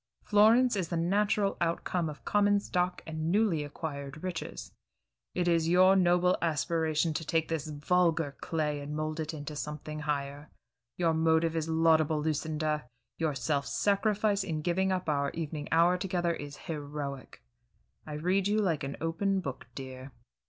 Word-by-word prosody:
Florence 225 +4 +5
is 185 -4 -1
the 170 - -2
natural 200 +3 +1
outcome 170 0 0
of 150 - -10
common 205 0 +3
stock 180 -2 -1
and 160 0 -3
newly 200 -7 +2
acquired 145 0 -6
riches. 180 -3 -5 0.6
It 180 -1 0
is 165 -1 +2
your 185 +2 +6
noble 180 -1 +3
aspiration 160 0 0
to 150 - -3
take 160 +1 0
this 160 -2 -2
vulgar 160 0 +1
clay 150 -3 -1
and 145 +1 -5
mold 155 +1 -3
it 155 -1 -2
into 150 -1 -7
something 150 +1 -5
higher. 145 0 -3 0.5
Your 170 -2 +2
motive 160 0 +2
is 160 0 -1
laudable, 160 -1 +3
Lucinda; 155 -1 -1 0.3
your 160 -3 0
self 140 +1 -1
sacrifice 205 0 +1
in 155 -5 -3
giving 190 +3 +1
up 185 -2 -2
our 140 -2 +1
evening 155 -2 -4
hour 170 +3 +4
together 175 -2 0
is 145 -2 -7
heroic. 145 -3 -6 0.6
I 155 - -6
read 180 +6 +1
you 210 +1 +1
like 175 -9 +1
an 135 +1 -4
open 190 +4 0
book, 140 -7 -6
dear." 130 0 -8
160 Hz, 155 wpm, -30 LUFS, 150-180 Hz, 0.6 s, your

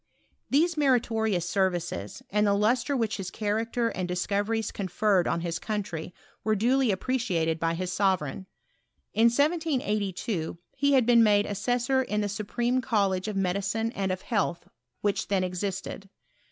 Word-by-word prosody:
These 320 +4 +2
meritorions 225 - +2
services, 175 - -2
and 210 +1 +2
the 200 - +3
lustre 240 +7 +1
which 225 -3 -1
his 190 -3 -4
character 225 +4 -1
and 185 -5 -3
discoveries 205 +5 -1
conferred 195 -1 +1
on 170 - 0
his 170 -1 -3
country 190 -6 -4 0.3
were 215 0 +2
duly 250 +4 +2
appreciated 190 -7 0
by 165 0 0
his 180 +1 -3
sovereign. 190 -3 0 0.7
In 225 +2 +4
1782 235 - 0 0.2
he 280 +1 +2
had 260 -3 +5
been 235 -1 +6
made 210 -2 +4
assessorin 245 +2 0
the 205 - -1
Supreme 235 +5 -1
Collegie 200 -5 0
of 205 - -3
Medicine 200 +4 0
and 195 -4 -2
of 185 0 -4
Health, 200 -7 -1 0.3
which 205 -1 0
then 195 -2 +1
existed. 195 +1 -4
205 Hz, 140 wpm, -27 LUFS, 185-235 Hz, 0.7 s, been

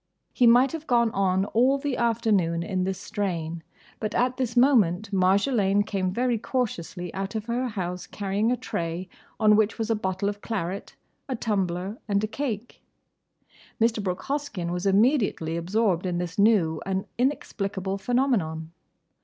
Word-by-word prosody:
—" - - -50
He 245 - +4
might 245 +3 +6
have 320 -1 -6
gone 235 -3 +3
on 190 -1 +1
all 250 +6 +3
the 280 -1 -2
afternoon 210 -8 +1
in 185 +1 -1
this 190 0 -2
strain, 170 -5 -3 0.4
but 215 0 -3
at 250 +1 +1
this 245 -2 -2
moment 215 -6 +3
Marjolaine 200 +2 +3
came 185 -3 -1
very 240 +2 0
cautiously 180 -8 -3
out 195 +3 -4
of 215 -1 -3
her 240 +2 -1
house 180 -5 -4
carrying 205 +3 -1
a 250 - +1
tray 170 -1 -4 0.3
on 215 -1 +6
which 215 0 +2
was 225 0 -1
a - - +3
bottle 190 -1 -2
of 205 0 -3
claret, 195 -3 -4 0.3
a 260 - -1
tumbler, 195 -2 -2
and 200 0 +1
a - - +1
cake. 240 -2 -4 1.0
Mr. 225 -1 +2
Brooke 180 -2 -3
Hoskyn 275 -12 -3
was 180 +2 -2
immediately 200 - +2
absorbed 185 +1 0
in 175 -1 -1
this 175 +2 -4
new 195 -7 +3
and 190 0 -2
inexplicable 200 -7 -1
phenomenon. 195 - 0
205 Hz, 160 wpm, -26 LUFS, 185-235 Hz, 1.0 s, might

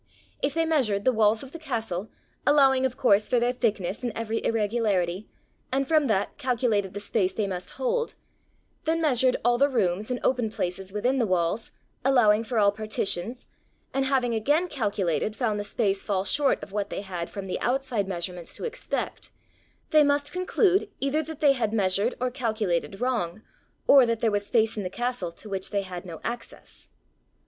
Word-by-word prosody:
If 280 +2 0
they 330 0 +2
measured 245 -11 +1
the 255 - +4
walls 220 +1 +3
of 270 - -10
the 335 - -8
castle, 220 - -3 0.3
allowing 270 -3 +5
of 255 0 -11
course 210 -5 +4
for 245 - +3
their 240 +1 +2
thickness 215 -6 -1
and 245 -2 -2
every 225 0 -2
irregularity, 210 -4 0 0.4
and 270 +1 +1
from 310 -2 +3
that, 200 -4 0
calculated 220 -6 0
the - - -3
space 195 -2 0
they 215 - -1
must 185 -2 -4
hold; 485 -1 -1 0.7
then 325 +1 +1
measured 260 -5 +3
all 240 0 +3
the 280 +1 +5
rooms 205 -4 0
and 250 -1 -1
open 245 -4 +1
places 190 -1 -4
within 245 +7 0
the 230 - +2
walls, 185 +4 0 0.3
allowing 230 -5 +4
for 230 +1 -3
all 200 -1 +5
partitions; 215 +1 -3 0.5
and 270 0 +1
having 260 -3 +1
again 290 +11 +2
calculated, 210 - -1
found 220 -4 0
the - - -2
space 200 -1 0
fall 195 -3 0
short 275 +9 +2
of - - -9
what 205 0 -2
they - - -4
had 180 -4 -5
from 200 -1 -6
the 185 - -3
outside 250 -6 0
measurements 175 -2 -5
to - - -7
expect; 475 +1 -4 0.6
they 305 -1 +7
must 285 0 +1
conclude 370 +2 +2
either 275 +3 +1
that 315 -1 -8
they 285 -2 +6
had 230 -5 -1
measured 200 +3 +2
or 255 0 0
calculated 215 -7 -1
wrong, 220 -6 -1 0.4
or 270 -3 +7
that 230 -1 0
there 225 -1 +2
was 205 0 -1
space 225 -1 +2
in 210 - -3
the 185 - -3
castle 240 -5 -2
to 170 - -12
which 195 -2 -3
they 200 -1 -1
had 185 -1 -7
no 165 -2 -7
access. 235 0 -6
225 Hz, 185 wpm, -26 LUFS, 200-265 Hz, 0.7 s, they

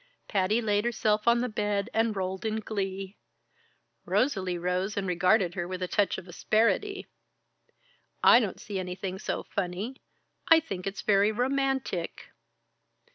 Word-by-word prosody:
Patty 205 +3 +1
laid 205 -1 +1
herself 215 -2 0
on 235 0 +5
the 250 - 0
bed 210 -2 -1
and 225 -1 +1
rolled 190 0 -3
in 220 0 -1
glee. 195 -2 -4 0.8
Rosalie 190 -9 0
rose 180 +3 -1
and 200 - -1
regarded 180 +1 +3
her 175 -1 -3
with 185 0 -4
a - - -1
touch 205 +2 +1
of 185 - -9
asperity. 230 - +1 1.2
"I - - +8
don't 210 -6 -3
see 200 -3 -5
anything 185 +1 -5
so - - -3
funny 200 +7 -4 0.5
I 325 -1 +8
think 195 - -6
it's 195 - -4
very 205 +1 +4
romantic." 265 -6 -1
205 Hz, 140 wpm, -28 LUFS, 185-225 Hz, 1.2 s, I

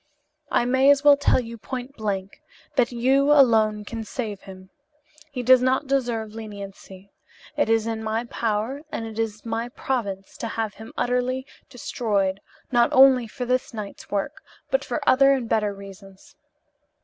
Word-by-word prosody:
"I 240 - +2
may 260 +2 +4
as 285 0 +5
well 290 -1 +8
tell 280 - +2
you 230 -2 -7
point 255 +4 -6
blank 200 -4 -4 0.3
that 250 -2 +2
you 265 +4 +2
alone 220 -7 +4
can 225 +1 -5
save 215 -3 -5
him. 190 -1 -13 0.6
He 250 -3 -4
does 255 +1 +6
not 260 +2 +1
deserve 240 -6 -1
leniency. 200 -3 -10 0.4
It 290 -6 +1
is 225 -1 +2
in 225 -1 -3
my 220 +1 -1
power 230 +3 -2
and 225 - -4
it 225 0 -7
is 220 -1 -3
my 230 +1 -3
province 205 -7 -4
to 230 - -4
have 225 -2 -3
him 220 +3 -11
utterly 250 +1 0 0.2
destroyed, 205 -7 -1 0.3
not 240 -1 +3
only 260 -2 +6
for 250 +3 -5
this 250 -1 -1
night's 210 -2 -8
work, 205 +9 -3 0.3
but - - +2
for - - -4
other 275 +1 +6
and 255 -4 -2
better 210 -2 +1
reasons. 195 -1 -13
230 Hz, 160 wpm, -24 LUFS, 210-255 Hz, 0.6 s, well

